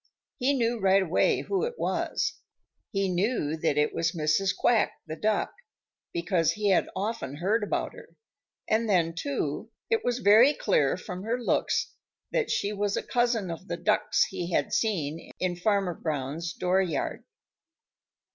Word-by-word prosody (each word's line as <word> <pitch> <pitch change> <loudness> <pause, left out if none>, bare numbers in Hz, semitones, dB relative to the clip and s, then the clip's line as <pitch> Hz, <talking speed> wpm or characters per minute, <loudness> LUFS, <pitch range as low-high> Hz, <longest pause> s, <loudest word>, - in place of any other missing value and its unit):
He 270 +2 +2
knew 235 -2 0
right 195 0 +4
away 175 -2 +2
who 395 0 -1
it 480 0 -3
was. - - -1 0.6
He 195 -1 0
knew 180 -4 0
that 150 -2 0
it 150 - +2
was 165 +1 0
Mrs. 160 +4 +1
Quack 235 -3 +3
the 155 -1 -5
Duck, 215 +4 0 0.6
because 170 -2 +1
he 210 -1 0
had 190 - +3
often 195 - -3
heard 205 +8 0
about 205 - -2
her. - - -12 0.6
And 220 +1 +1
then, 170 -4 +2
too, 280 - -3 0.2
it 450 -1 +2
was 245 -1 0
very 240 +6 +6
clear 150 -7 +2
from 180 0 -7
her 225 +4 -1
looks 240 - 0 0.4
that 475 -3 0
she 205 +1 0
was 205 0 -1
a - - -2
cousin 235 -6 0
of 170 +3 -8
the - - -3
ducks - - +2
he 175 0 -5
had - - 0
seen 165 -8 -1
in 180 -1 0
Farmer 195 0 +1
Brown's 155 +1 -3
dooryard. 180 -4 0
195 Hz, 155 wpm, -27 LUFS, 170-225 Hz, 0.6 s, very